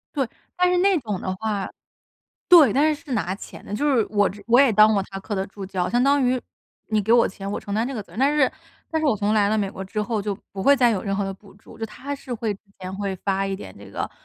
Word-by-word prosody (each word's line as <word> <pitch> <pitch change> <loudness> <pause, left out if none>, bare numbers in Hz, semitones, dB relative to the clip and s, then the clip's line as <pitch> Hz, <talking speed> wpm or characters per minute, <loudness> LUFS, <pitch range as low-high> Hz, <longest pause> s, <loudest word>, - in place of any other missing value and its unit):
对， 270 -4 +1 0.3
但 360 0 +3
是 360 - +2
那 385 +1 +4
种 210 -7 -4
的 185 - -3
话 210 -2 -2 0.8
对， 325 - +8
但 300 +3 +3
是 300 +2 -7
是 285 - -7
拿 185 -6 -1
钱 195 - -11
的， - - -9
就 285 +8 0
是 225 - +3
我 205 -1 +3
之 205 +1 -10
我 240 +3 +6
也 275 -4 +5
当 215 +1 +6
过 200 - +2
他 195 - -6
课 205 +2 -5
的 190 0 -2
助 195 0 -9
教， 185 -1 -2
相 240 +2 +2
当 280 +2 +4
于， 250 0 +1 0.5
你 215 -1 +2
给 215 +3 +1
我 235 0 +6
钱， 195 +1 -7
我 - - -3
承 200 - -7
担 220 +3 +1
这 270 - -4
个 220 - -4
责 - - -23
任。 - - -10
但 280 +3 +3
是 270 -3 +3 0.4
但 320 - 0
是 310 - 0
我 230 - +3
从 205 +1 0
来 210 -2 +3
了 215 - +1
美 200 -2 -1
国 190 -1 -7
之 210 +3 -3
后， 220 0 -1
就 200 -1 -3
不 195 - -7
会 280 +8 +6
再 245 -3 +4
有 205 -4 0
任 195 -1 -1
何 205 - 0
的 195 0 -3
补 195 +1 -17
助。 200 - -16
就 225 - -3
他 275 +6 -7
是 270 -3 -5
会 225 -2 -2
之 200 - -12 0.2
前 185 0 -6
会 200 -1 -2
发 195 +1 -1
一 195 - -2
点 95 - -9
这 100 - -12
个 100 - -4
215 Hz, 315 characters per minute, -23 LUFS, 195-260 Hz, 0.8 s, 对